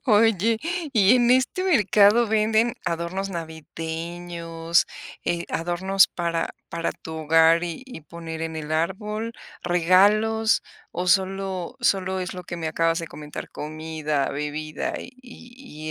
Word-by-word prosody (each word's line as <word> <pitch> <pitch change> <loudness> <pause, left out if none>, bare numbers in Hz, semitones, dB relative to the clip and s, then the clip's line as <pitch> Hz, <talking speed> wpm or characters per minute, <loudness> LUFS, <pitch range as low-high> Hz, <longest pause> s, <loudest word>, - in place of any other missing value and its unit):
Oye, 225 -1 +3 0.3
y 215 +1 +5
en 240 0 +3
este 260 +8 +2
mercado 215 - +5
¿venden 220 +2 +2
adornos 170 +4 -2
navideños, 165 +1 -3 0.4
eh, 170 0 -1
adornos 185 +3 +2
para 170 -1 -2 0.2
para 165 0 -2
tu 160 - -9
hogar 165 +2 +4
y 170 +6 -5
y 250 - -9
poner 165 0 -7
en 160 0 -4
el 155 0 -5
árbol, 210 +7 -2 0.3
regalos?, 205 +6 +3 0.3
o 180 +2 -3
solo 190 +2 0
solo 190 -4 +1
es 180 0 -4
lo 180 - -7
que 175 - -6
me 160 -1 -3
acabas 165 +1 +1
de 165 - -5
comentar, 150 -1 -8
comida, 155 -2 -3
bebida 150 +1 -4
y - - -9
y 245 - -10
175 Hz, 130 wpm, -24 LUFS, 165-210 Hz, 0.4 s, y